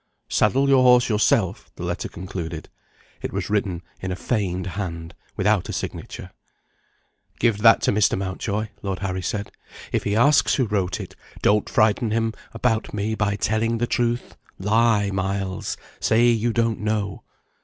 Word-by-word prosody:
"Saddle 135 +2 +2
your 135 -1 +5
horse 125 0 +5
yourself," 105 -1 +1
the - - -7
letter - - -3
concluded. 85 -3 -6 0.5
It - - -4
was - - -3
written 95 -5 -1 0.2
in 95 - -4
a - - -1
feigned 95 -4 -2
hand, 85 -3 -5 0.2
without 105 -2 +1
a - - -3
signature. - - -6 1.1
"Give 115 -3 +2
that 115 +1 +6
to - - +3
Mr. 105 0 +2
Mountjoy," 100 +3 -3
Lord 95 -2 -3
Harry 95 -1 -2
said. 100 +2 -3 0.4
"If - - 0
he 100 - 0
asks 140 +6 +4
who 130 - +2
wrote 95 -4 -1
it, - - -8 0.3
don't 105 0 +3
frighten 110 +1 +2
him 115 0 0 0.2
about 115 -2 -1
me 105 +2 -1
by 105 -2 0
telling 110 +3 0
the 120 - 0
truth. 120 0 -1 0.2
Lie, 105 0 +2
Miles! 95 -1 -2 0.2
Say 120 +2 +4
you 115 0 +2
don't 115 -1 0
know." 105 -2 -2
105 Hz, 155 wpm, -23 LUFS, 95-115 Hz, 1.1 s, that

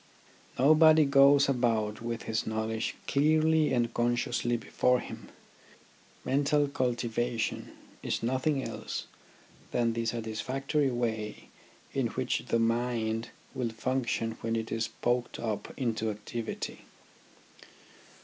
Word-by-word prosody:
Nobody 155 +2 +6
goes 140 0 +6
about 115 -5 0
with 115 0 -4
his 110 0 -2
knowledge 110 0 -2
clearly 155 +1 +3
and 120 -2 +1
consciously 120 0 0
before 125 +2 +1
him. - - -9 1.0
Mental 145 +1 +2
cultivation 120 -3 -2 0.3
is - - -2
nothing 130 +3 0
else - - -5 0.6
than 115 -1 +1
the 115 0 -2
satisfactory 130 +6 -1
way 110 -3 -3 0.4
in - - +1
which - - -2
the - - +2
mind 115 -1 0 0.2
will 125 -2 -1
function 115 0 -1
when 115 0 -1
it 115 0 -3
is 115 0 0
poked 120 0 -1
up 110 -3 -3
into 115 -3 -1
activity. 110 +2 -5
120 Hz, 110 wpm, -30 LUFS, 115-135 Hz, 1.0 s, Nobody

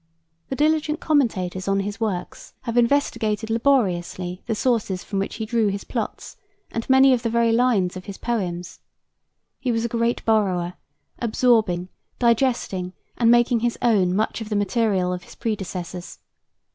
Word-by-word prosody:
The 265 - -2
diligent 305 +1 +1
commentators 190 - 0
on 195 0 +2
his 205 +2 -5
works 205 -6 -4
have 235 -2 -4
investigated 230 -4 +1
laboriously 185 -7 0
the 225 - 0
sources 210 -6 0
from 195 - -3
which 195 - -3
he 220 - -4
drew 225 -1 +1
his 200 0 -2
plots - - -5 0.3
and 230 +2 -4
many 265 0 +7
of 245 - +1
the 230 - -1
very 230 0 +2
lines 225 -7 +2
of 185 - -8
his 200 -2 -7
poems. 180 -7 -3 0.8
He 250 - -1
was 225 0 0
a - - +1
great 235 +1 -1
borrower; 185 -6 +1 0.5
absorbing, 215 -6 +2 0.3
digesting, 235 -7 +1 0.2
and 230 -1 +3
making 240 0 +4
his 240 +1 -1
own 195 -6 +3
much 220 +2 -1
of 220 - -6
the 210 - -1
material 205 -3 +1
of 180 - -4
his - - -14
predecessors. 185 -5 -5
220 Hz, 160 wpm, -23 LUFS, 185-240 Hz, 0.8 s, many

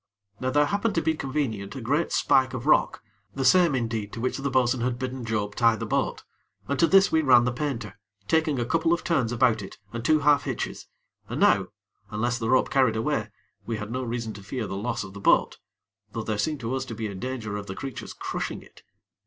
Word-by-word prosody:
Now 130 - -1
there 145 +3 +3
happened 205 +5 0
to 165 - +2
be 160 - +2
convenient 130 -9 -3
a - - -5
great 145 +8 0
spike 130 -1 +3
of 120 - -5
rock, - - +3 0.3
the 135 -1 -1
same, 175 -4 +5
indeed, 115 -4 -2
to - - -6
which 130 +3 -1
the 140 +1 -1
bo'sun 130 -1 +2
had 120 0 -1
bidden 130 0 -4
Job 105 -3 -2
tie 115 0 +3
the - - -5
boat, - - -1 0.4
and 140 - -1
to 165 - +5
this 195 +1 +5
we 160 - +3
ran 125 -5 +6
the 125 - +1
painter, 120 -6 -4 0.3
taking 160 -1 +2
a 120 - 0
couple 165 +5 +2
of 170 - -1
turns 130 -9 +1
about 120 -2 +2
it 95 - -9 0.2
and 115 0 -4
two 155 +3 +3
half 145 -3 +4
hitches, - - -4 0.4
and - - -3
now, - - +4 0.4
unless 120 +3 -1
the 115 -1 -2
rope 130 +1 +3
carried 130 -5 +3
away, 110 -2 -1 0.4
we 115 -1 -2
had 105 +1 -6
no 130 +2 -2
reason 115 -2 -3
to 100 - -10
fear 110 +4 -4
the 95 - -5
loss 105 +4 -2
of 95 -1 -10
the 100 - -8
boat; - - +3 0.5
though 115 - -3
there 110 -1 -2
seemed 150 +4 -1
to 115 +2 -3
us 130 0 -1
to 115 - -7
be 110 0 -4
a 105 - -4
danger 110 0 -4
of 100 -1 -5
the 95 - -5
creature's 135 +2 -7
crushing - - -4
it. - - -19
125 Hz, 230 wpm, -26 LUFS, 110-140 Hz, 0.5 s, ran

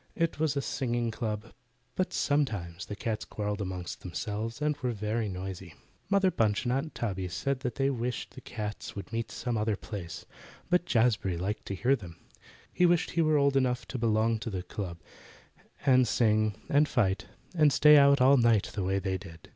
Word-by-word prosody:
It 165 -2 -1
was 155 -3 +1
a 140 - 0
singing 120 -2 -1
club, 110 -1 -4 0.4
but 185 - -1
sometimes 100 - -1
the 105 - -5
cats 110 0 -3
quarrelled 105 -1 -3
among 95 -2 -4
themselves, 105 +5 -4
and 150 0 +1
were 125 -4 -2
very 110 +1 -2
noisy. 95 -2 -6 0.3
Mother 200 -2 +3
Bunch 105 -7 +1
and 120 - +1
Aunt 140 +4 -2
Tabby 95 -5 -2
said 130 +9 -2
they 135 +2 0
wished 125 -1 -3
the - - -10
cats 105 -2 -6
would 100 +3 -8
meet 115 0 -2
some 120 -3 -2
other 105 0 +1
place; 100 -5 -7 0.5
but 175 0 +3
Jazbury 110 - +2
liked 100 +5 -3
to 100 - -3
hear 125 +8 +3
them. 90 -9 -10 0.6
He 180 - +4
wished 175 -1 +2
he 170 - +1
were 155 -1 +3
old 140 -1 +3
enough 125 -2 +1
to 130 - -4
belong 110 0 +2
to 115 - -4
the 95 -4 -4
club, 90 -2 -5 0.9
and 130 -3 +5
sing 110 -2 +2
and 145 +1 +3
fight, 105 -7 +1 0.3
and 155 -4 +4
stay 150 +2 +7
out 140 -1 +6
all 135 +2 +6
night 115 -4 +3
the 100 - -2
way 95 +1 +1
they 95 -1 -2
did. 80 -1 -13
115 Hz, 185 wpm, -29 LUFS, 100-135 Hz, 0.9 s, stay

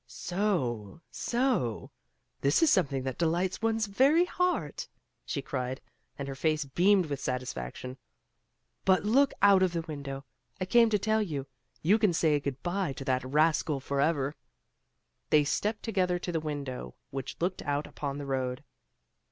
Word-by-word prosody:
"So! 160 - -2
So! 235 - -1 0.5
this 140 - +3
is 320 - +5
something 140 -7 +2
that 130 -2 -4
delights 175 +4 0
one's 225 0 +1
very 275 - +4
heart!" 360 0 -1 0.4
she 140 - -2
cried, 130 0 -3 0.4
and 140 - -4
her 135 - -4
face 155 +2 0
beamed 185 +7 +3
with 140 -3 -4
satisfaction. 125 - -4 0.8
"But 190 0 +3
look 270 +6 +4
out 200 -2 +7
of 185 -2 +2
the 165 -1 -1
window! 140 -3 -6 0.3
I 185 - -1
came 230 +4 +5
to 210 - +3
tell 220 +2 +1
you! 150 -9 -3 0.4
You 200 +8 +4
can 210 -5 +3
say 155 -3 +3
good 140 -2 -5
bye 175 -4 -1
to 135 - -8
that 130 -1 +1
rascal 150 +1 +2
forever." 140 +1 0 0.9
They 150 -1 +5
stepped 210 +9 -1
together 185 -5 +1
to 175 0 -4
the 165 - 0
window 140 - -5 0.2
which 135 -1 -5
looked 180 +2 -1
out 145 0 -1
upon 140 -1 -5
the 145 - -5
road. 130 -2 -2
155 Hz, 155 wpm, -29 LUFS, 135-195 Hz, 0.9 s, out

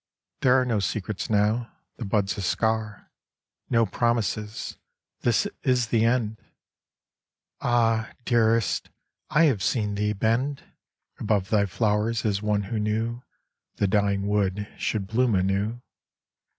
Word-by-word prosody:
There 130 0 +5
are 130 - +1
No 115 -4 +1
secrets 100 0 -3
now, 110 +3 +1 0.3
the 120 - -5
bud's 100 0 0
a 100 - -4
scar; 110 +2 -1 0.6
No 115 -2 +3
promises, 110 0 -1 0.4
this 120 -2 +2 0.2
is 125 -4 +1
the 115 -1 +3
end! 115 -2 0 1.2
Ah, 115 -2 +2 0.2
Dearest, 115 -2 +2 0.4
I 150 +2 +4
have 130 -11 +3
seen 105 0 0
thee 105 +1 0
bend 120 +7 0 0.6
Above 105 -3 0
thy 100 -2 +3
flowers 110 +3 0
as 100 -2 0
one 105 -1 0
who 110 +3 -3
knew 110 +3 -1 0.5
The - - 0
dying 100 0 +1
wood 105 0 0
should 105 -3 -2
bloom 115 +2 +1
anew. 100 +6 0
110 Hz, 125 wpm, -26 LUFS, 105-115 Hz, 1.2 s, There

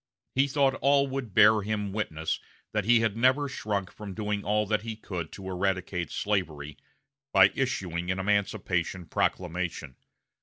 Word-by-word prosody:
He 135 +2 +3
thought 135 -1 +2
all 140 0 +4
would 130 -6 -5
bear 105 0 +7
him 105 -1 -2
witness 80 -7 -2 0.3
that 105 -2 -1
he 120 0 +5
had 110 -2 +1
never 130 +5 +3
shrunk 100 -7 -3
from 100 -3 -8
doing 105 -1 -2
all 105 +1 +1
that 105 +1 0
he 115 0 -5
could 90 -7 -6
to 95 -1 -8
eradicate 95 -1 -1
slavery, 80 -8 -2 0.6
by 95 -1 +7
issuing 90 -10 -2
an 95 - 0
emancipation 95 -3 0
proclamation. 85 -4 -2
100 Hz, 150 wpm, -28 LUFS, 90-110 Hz, 0.6 s, bear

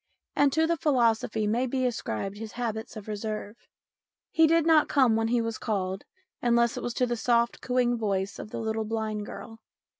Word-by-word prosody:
And 285 -1 +4
to 320 +1 +3
the 335 +1 +1
philosophy 230 -6 +1
may 235 +5 +1
be 255 +1 -1
ascribed 200 - -3
his 220 -1 -7
habits 225 -2 -4
of 210 - -9
reserve. 215 0 -4 0.8
He 325 -2 +5
did 330 0 +3
not 320 -2 +5
come 255 -6 +4
when 225 0 +1
he 235 +1 +2
was 230 -1 -3
called, 195 -4 -2 0.4
unless 235 -1 +3
it - - -4
was 240 - -4
to 250 - +2
the 240 -1 -1
soft, 235 0 +1
cooing 245 -1 +1
voice 200 -2 -1
of - - -7
the - - -6
little 220 0 -2
blind 215 -1 -3
girl. 225 -1 -9
230 Hz, 190 wpm, -27 LUFS, 215-250 Hz, 0.8 s, He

